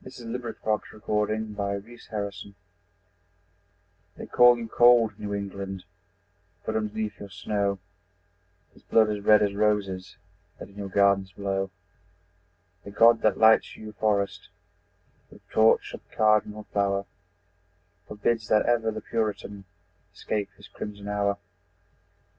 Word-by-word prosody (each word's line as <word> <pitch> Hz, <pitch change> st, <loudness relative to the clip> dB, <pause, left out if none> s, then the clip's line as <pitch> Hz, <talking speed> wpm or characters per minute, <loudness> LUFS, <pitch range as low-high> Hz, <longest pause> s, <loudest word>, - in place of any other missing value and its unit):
Century 120 Hz, -3 st, -8 dB
Amelia 125 Hz, -1 st, -5 dB
Josephine 110 Hz, 0 st, -1 dB
Burr 100 Hz, -1 st, -2 dB, 0.3 s
Ghosts 100 Hz, -2 st, -5 dB, 1.7 s
They -, -, -7 dB
call 120 Hz, 0 st, +6 dB
you 115 Hz, -1 st, -6 dB
cold 115 Hz, -3 st, +4 dB
New 105 Hz, -1 st, -5 dB
England, 100 Hz, -1 st, -5 dB, 0.8 s
But -, -, -2 dB
underneath 110 Hz, 0 st, -3 dB
your 100 Hz, -, -9 dB
snow 100 Hz, 0 st, -1 dB, 1.0 s
Is -, -, -20 dB
blood 110 Hz, -1 st, +3 dB
as 105 Hz, -, -3 dB
red 105 Hz, 0 st, +6 dB
as 100 Hz, -1 st, 0 dB
roses 100 Hz, -3 st, -1 dB, 0.4 s
That -, -, -10 dB
in 100 Hz, -, -19 dB
your 100 Hz, -1 st, -5 dB
gardens 100 Hz, -1 st, +2 dB
blow. 95 Hz, -1 st, -2 dB, 1.1 s
The -, -, -9 dB
God 115 Hz, +3 st, +5 dB
that 110 Hz, -, +2 dB
lights 110 Hz, 0 st, +4 dB
your 110 Hz, -1 st, -9 dB
forest 100 Hz, -1 st, -1 dB, 0.8 s
With -, -, -18 dB
torch 110 Hz, 0 st, +3 dB
of -, -, -8 dB
cardinal 105 Hz, -1 st, +1 dB
flower, 100 Hz, -1 st, +1 dB, 1.0 s
Forbids 110 Hz, +1 st, -1 dB
that 105 Hz, -, +3 dB
ever 115 Hz, -2 st, +2 dB
the 110 Hz, 0 st, -5 dB
Puritan 105 Hz, -3 st, -3 dB, 0.5 s
Escape 105 Hz, -2 st, -3 dB
his -, -, -14 dB
crimson 100 Hz, -1 st, -8 dB
hour. 100 Hz, -1 st, 0 dB
105 Hz, 125 wpm, -26 LUFS, 100-110 Hz, 1.7 s, call